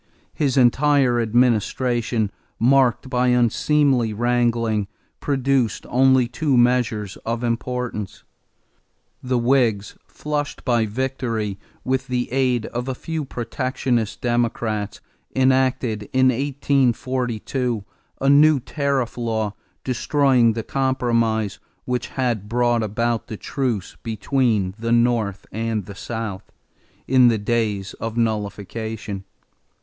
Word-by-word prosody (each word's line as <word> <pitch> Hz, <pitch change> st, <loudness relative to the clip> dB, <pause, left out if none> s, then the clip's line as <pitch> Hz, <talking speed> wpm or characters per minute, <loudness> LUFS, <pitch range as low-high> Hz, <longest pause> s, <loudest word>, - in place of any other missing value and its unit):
His 140 Hz, -3 st, 0 dB
entire 130 Hz, -1 st, +4 dB
administration, 120 Hz, -1 st, +1 dB, 0.3 s
marked 130 Hz, +1 st, +3 dB
by 125 Hz, -1 st, +1 dB
unseemly 125 Hz, 0 st, +2 dB
wrangling, 115 Hz, -2 st, +1 dB, 0.3 s
produced 135 Hz, -5 st, 0 dB
only 130 Hz, 0 st, +4 dB
two 135 Hz, +2 st, 0 dB
measures 120 Hz, -4 st, +1 dB
of 115 Hz, +1 st, -4 dB
importance. 120 Hz, -3 st, -3 dB, 1.0 s
The 125 Hz, -1 st, 0 dB
Whigs, 120 Hz, -5 st, +1 dB
flushed 150 Hz, -1 st, -4 dB
by 120 Hz, -4 st, +2 dB
victory, 115 Hz, -4 st, -2 dB, 0.2 s
with 130 Hz, +1 st, -1 dB
the 125 Hz, -1 st, -2 dB
aid 125 Hz, -3 st, +1 dB
of 120 Hz, +2 st, -4 dB
a 130 Hz, -, -2 dB
few 160 Hz, +2 st, -4 dB
protectionist 120 Hz, -2 st, -2 dB
Democrats, 115 Hz, -3 st, -1 dB, 0.3 s
enacted, 130 Hz, -5 st, +1 dB
in 130 Hz, 0 st, +5 dB
1842, 130 Hz, -3 st, 0 dB, 0.4 s
a 135 Hz, -, 0 dB
new 145 Hz, +1 st, +6 dB
tariff 130 Hz, -1 st, -2 dB
law 110 Hz, -3 st, -1 dB, 0.3 s
destroying 130 Hz, -2 st, +2 dB
the 115 Hz, 0 st, -4 dB
compromise 115 Hz, -6 st, 0 dB, 0.3 s
which 125 Hz, -1 st, -2 dB
had 120 Hz, -6 st, -2 dB
brought 120 Hz, 0 st, +2 dB
about 115 Hz, +2 st, -1 dB
the 110 Hz, -, -6 dB
truce 120 Hz, -8 st, -3 dB
between 110 Hz, -3 st, 0 dB
the 115 Hz, +1 st, -2 dB
North 115 Hz, -4 st, +1 dB
and 110 Hz, -2 st, -2 dB
the 100 Hz, -, -9 dB
South, 110 Hz, -2 st, -6 dB, 0.6 s
in 130 Hz, -1 st, +6 dB
the 115 Hz, -2 st, +3 dB
days 105 Hz, -2 st, -1 dB
of 115 Hz, +1 st, -4 dB
nullification. 110 Hz, -2 st, -3 dB
120 Hz, 105 wpm, -22 LUFS, 110-130 Hz, 1.0 s, new